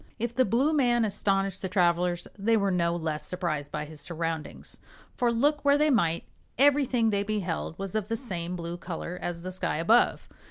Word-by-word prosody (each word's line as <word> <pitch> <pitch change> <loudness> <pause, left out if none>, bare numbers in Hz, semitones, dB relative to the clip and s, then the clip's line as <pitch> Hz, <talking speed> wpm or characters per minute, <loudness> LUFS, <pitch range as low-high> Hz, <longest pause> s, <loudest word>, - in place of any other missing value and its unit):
If 235 +1 -2
the 255 +1 +3
blue 260 +10 +2
man 240 -5 +3
astonished 195 -2 0
the 190 - -3
travelers 175 -1 +1
they 220 +3 +2
were 200 -2 +1
no 170 -1 +1
less 160 -3 -3
surprised 160 -6 -3
by 150 0 -3
his 150 -1 -11
surroundings, 165 -2 -5 0.3
for 240 -2 +1
look 290 +6 +1
where 285 0 +5
they 300 0 +3
might, 170 -9 +2 0.3
everything 265 -4 +3
they 200 -1 +1
beheld 195 -6 -3
was 195 -1 -5
of 215 -2 -1
the 225 +1 -1
same 180 -8 -4
blue 170 0 -5
color 180 0 -6
as 170 -1 -4
the 185 - -4
sky 185 - -2
above. 220 +9 +3
195 Hz, 190 wpm, -28 LUFS, 170-235 Hz, 0.3 s, where